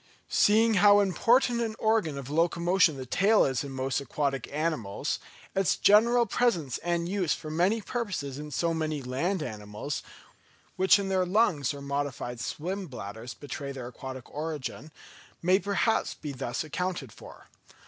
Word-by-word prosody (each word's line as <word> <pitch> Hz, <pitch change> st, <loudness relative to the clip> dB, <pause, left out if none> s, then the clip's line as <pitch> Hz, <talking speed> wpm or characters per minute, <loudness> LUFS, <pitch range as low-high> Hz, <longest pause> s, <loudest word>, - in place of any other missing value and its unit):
Seeing 220 Hz, +2 st, +4 dB
how 205 Hz, 0 st, +7 dB
important 235 Hz, +5 st, +3 dB
an 225 Hz, -2 st, -2 dB
organ 215 Hz, -10 st, +1 dB
of 135 Hz, -3 st, -6 dB
locomotion 170 Hz, 0 st, +3 dB
the 130 Hz, -, -6 dB
tail 205 Hz, -, +4 dB
is 130 Hz, -2 st, -1 dB
in 140 Hz, -, -6 dB
most 130 Hz, +1 st, -1 dB
aquatic 140 Hz, -1 st, -2 dB
animals, 145 Hz, -10 st, -2 dB, 0.3 s
its 190 Hz, -4 st, +2 dB
general 235 Hz, +4 st, +5 dB
presence 175 Hz, -, 0 dB
and 170 Hz, -1 st, -1 dB
use 185 Hz, -3 st, 0 dB
for 155 Hz, -, -8 dB
many 185 Hz, +8 st, +2 dB
purposes 185 Hz, -, -4 dB
in 150 Hz, 0 st, -7 dB
so 165 Hz, +3 st, 0 dB
many 155 Hz, -3 st, -2 dB
land 155 Hz, +8 st, -1 dB
animals, 105 Hz, +3 st, -5 dB, 0.7 s
which 190 Hz, +1 st, +5 dB
in 200 Hz, -1 st, -3 dB
their 190 Hz, -1 st, +2 dB
lungs 180 Hz, -, +2 dB
or 140 Hz, -1 st, -8 dB
modified 140 Hz, -4 st, -3 dB
swim 185 Hz, +9 st, -4 dB
bladders 115 Hz, 0 st, -8 dB
betray 140 Hz, -1 st, -6 dB
their 130 Hz, -3 st, -6 dB
aquatic 130 Hz, 0 st, -8 dB
origin, 150 Hz, -2 st, -5 dB, 0.5 s
may 185 Hz, +3 st, +4 dB
perhaps 200 Hz, +2 st, 0 dB
be 150 Hz, -, -6 dB
thus 130 Hz, -1 st, -3 dB
accounted 165 Hz, -4 st, -3 dB
for. -, -, -13 dB
160 Hz, 150 wpm, -28 LUFS, 135-195 Hz, 0.7 s, how